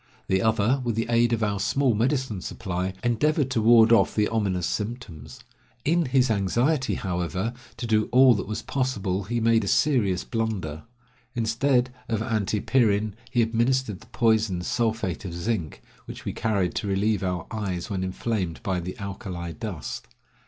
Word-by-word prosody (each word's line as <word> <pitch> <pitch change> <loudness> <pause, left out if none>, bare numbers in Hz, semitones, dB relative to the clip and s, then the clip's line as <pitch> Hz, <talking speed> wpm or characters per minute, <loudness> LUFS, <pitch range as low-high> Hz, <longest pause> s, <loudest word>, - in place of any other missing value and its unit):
The 95 0 +1
other, 110 +4 +2
with 120 -3 -1
the 115 - 0
aid 120 0 +3
of 115 -1 +1
our 100 -1 0
small 125 +5 +2
medicine 120 -2 0
supply, 95 0 -3
endeavored 135 +3 +1
to 115 - +1
ward 115 0 +6
off 110 -4 +4
the 105 -1 +2
ominous 95 -6 0
symptoms. 110 -6 -5 0.4
In 170 +2 +2
his 130 -2 +3
anxiety, 120 - +1
however, 90 +4 -2 0.2
to 120 - -4
do 110 -2 +1
all 130 0 +7
that 100 -4 -3
was 105 +1 -4
possible 100 -8 -1
he 120 +4 -1
made 115 0 +3
a - - -4
serious 105 -11 +2
blunder. 105 -9 -3 0.5
Instead 125 +2 +1 0.2
of 110 - 0
antipyrin 110 -1 +1 0.2
he 120 -2 +2
administered 115 -2 0
the 110 - -17
poison, 110 -6 +1
sulphate 110 - -1
of 85 -3 -6
zinc, 85 - -3 0.2
which - - -9
we - - -2
carried 100 -5 0
to 105 - -2
relieve 100 +2 +1
our 90 -3 -2
eyes 100 -4 -3
when 95 -2 -1
inflamed 95 -2 -2
by 95 -2 0
the 90 +1 -6
alkali 95 -3 -5
dust. 90 -2 -6
110 Hz, 160 wpm, -25 LUFS, 95-120 Hz, 0.5 s, all